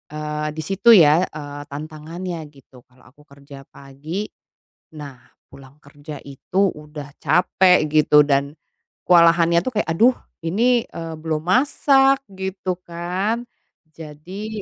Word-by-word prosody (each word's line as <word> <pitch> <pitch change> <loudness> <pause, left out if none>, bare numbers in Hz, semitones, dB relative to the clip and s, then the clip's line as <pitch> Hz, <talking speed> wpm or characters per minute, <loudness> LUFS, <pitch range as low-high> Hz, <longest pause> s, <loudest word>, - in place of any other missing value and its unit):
eee, 150 0 -4
di 155 - -4
situ 195 +7 +1
ya, 160 0 +5
eee, 145 -1 -9
tantangannya 160 +4 -7
gitu. 135 -3 -19
Kalau 125 0 -25
aku 135 +5 -21
kerja 140 -1 -14
pagi, 145 +9 -7 0.7
nah 140 -3 -9 0.3
pulang 135 +2 -17
kerja 145 +1 -11
itu 140 +7 -5 0.2
udah 150 -1 -11
capek 180 -2 +3
gitu 150 0 +4
dan 140 0 +1 0.6
kewalahannya 170 -1 +5
tuh 255 - -3
kayak, - - -2
"Aduh 245 +7 +5 0.3
ini, 235 +7 +2
eee, 165 -1 -7
belum 155 -1 -3
masak," 270 +4 +3
gitu 190 -1 -4
kan. 185 +7 -3 0.5
Jadi, 180 +8 -8
155 Hz, 125 wpm, -21 LUFS, 145-185 Hz, 0.7 s, ya